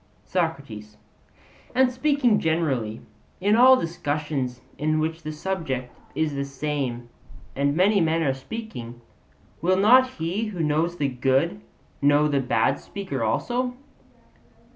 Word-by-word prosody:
SOCRATES: 140 - -3 0.8
And 260 0 +4
speaking 255 -4 +2
generally, 140 -10 -1 0.4
in 205 +3 +3
all 255 +2 +8
discussions 145 -6 -3 0.2
in 155 +1 +1
which 160 +1 -2
the 155 - -5
subject 150 -7 -4 0.2
is 155 -2 0
the 140 0 -2
same 135 -4 -3 0.5
and 140 +1 +1
many 195 +3 +4
men 165 0 +1
are 135 -3 +1
speaking, 130 - -7 0.6
will 185 +2 +2
not 255 +6 +5
he 175 +7 -2
who 195 -6 -4
knows 160 +3 0
the 145 - +1
good 130 - 0 0.4
know 145 +1 +4
the 140 -2 +1
bad 135 +2 +1
speaker 185 - -5
also? 245 - -1
155 Hz, 125 wpm, -24 LUFS, 135-190 Hz, 0.8 s, all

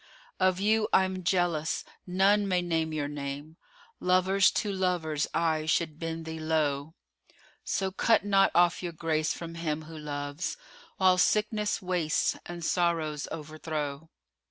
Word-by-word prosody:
Of 185 -1 +3
you 215 +2 +2
I'm 185 -1 +2
jealous: 170 -3 +1 0.2
none 195 +3 +3
may 180 -2 +1
name 165 -2 0
your 150 -2 -2
name: 145 +2 -6 0.2
* 465 - -26
Lovers 185 +1 +4
to 210 - -1
lovers 175 -5 0
aye 160 -2 0
should 160 -1 0
bend 165 0 -4
thee 160 0 -5
low: 155 -1 -1 0.7
So 190 -1 -1
cut 215 +2 +2
not 195 -1 +4
off 175 0 +4
your 175 -2 -4
grace 155 -1 0
from 165 -1 -6
him 160 -2 -3
who 160 +1 -11
loves 145 - -4 0.2
* 485 - -24
While 185 -1 +4
sickness 210 +1 +1
wastes 180 -4 +1
and 175 -1 -6
sorrows 165 -5 0
overthrow. 155 -1 -5
165 Hz, 145 wpm, -29 LUFS, 155-185 Hz, 0.7 s, Lovers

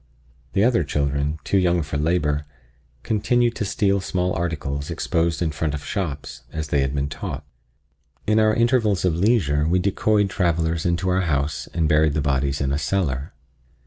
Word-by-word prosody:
The 100 - +3
other 115 -7 +3
children, 70 +1 -1
too 100 - +2
young 90 -2 +2
for 75 -1 -6
labor, 75 -1 0 0.6
continued 120 +2 +1
to 105 - -1
steal 100 0 +1
small 90 -1 -1
articles 75 -4 -3
exposed 85 0 0
in 80 - 0
front 75 0 -2
of 75 - -7
shops, 80 -9 -4
as 80 -1 -4
they 70 - +2
had 70 +1 -1
been 70 0 0
taught. 75 0 -6 0.8
In 105 +1 +3
our 110 0 +4
intervals 115 -5 +2
of 90 - +2
leisure 85 -6 +2
we 90 +3 +3
decoyed 100 +2 +1
travelers 85 -3 0
into 85 +2 0
our 90 +1 +2
house 70 -4 -1
and 80 -2 0
buried 75 -1 +3
the - - +1
bodies 70 0 0
in 70 -1 0
a 70 - 0
cellar. 70 -3 -1
80 Hz, 175 wpm, -23 LUFS, 75-95 Hz, 0.8 s, our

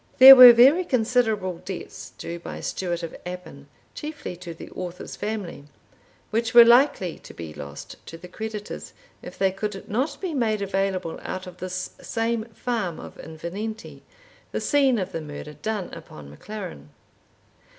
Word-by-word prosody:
There 265 +1 +12
were 250 -1 +12
very 265 +10 +6
considerable 225 - 0
debts 190 - -8
due 170 0 -6
by - - -8
Stewart 175 -2 -3
of 165 - -6
Appin 170 -6 -9 0.3
(chiefly 300 - -7
to 175 -1 -8
the 165 - -11
author's 180 -1 -7
family), 205 -8 -5 0.7
which 225 +1 -1
were 235 -1 +11
likely 235 - +3
to - - -13
be 80 -2 -8
lost 70 -1 -10
to 165 - -8
the 180 - -11
creditors, 215 +2 -7 0.3
if - - -10
they 195 -1 +2
could 195 +1 -5
not 255 +8 -2
be 370 -4 -4
made 220 -6 0
available 195 -3 -2
out 185 +1 -5
of 180 -1 -11
this 185 0 -5
same 225 -1 -2
farm 225 -6 -3
of - - -11
Invernenty, 190 +8 -7 0.5
the - - -2
scene 275 -4 +2
of 190 -2 -3
the 165 - -4
murder 150 0 -8
done 205 +5 -4
upon 75 - -11
MacLaren. 185 - -8
195 Hz, 155 wpm, -24 LUFS, 170-230 Hz, 0.7 s, There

